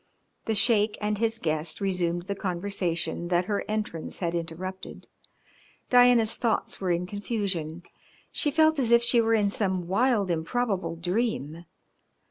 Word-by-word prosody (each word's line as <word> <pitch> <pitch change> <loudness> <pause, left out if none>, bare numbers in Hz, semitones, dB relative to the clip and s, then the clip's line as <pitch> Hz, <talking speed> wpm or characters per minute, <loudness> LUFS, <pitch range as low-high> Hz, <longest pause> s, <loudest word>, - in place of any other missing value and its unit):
The 220 - 0
Sheik 210 -1 +2
and 210 -1 -1
his 225 0 +1
guest 155 -4 -2
resumed 175 -3 -1
the 200 - -3
conversation 180 -3 -2
that 175 0 +1
her 205 0 -1
entrance 210 -7 -4
had 170 -2 -2
interrupted. 175 +3 -6 0.8
Diana's 245 -3 +5
thoughts 230 -4 -1
were 185 - -1
in 175 +1 0
confusion. 185 -5 -3 0.5
She 295 - +1
felt 315 +1 +3
as 245 -4 +1
if 235 0 +5
she 235 0 +5
were 225 0 +2
in 205 -2 +2
some 190 -4 -1
wild, 205 -1 +2
improbable 185 +3 -1
dream. 175 - -2
200 Hz, 140 wpm, -27 LUFS, 175-225 Hz, 0.8 s, Diana's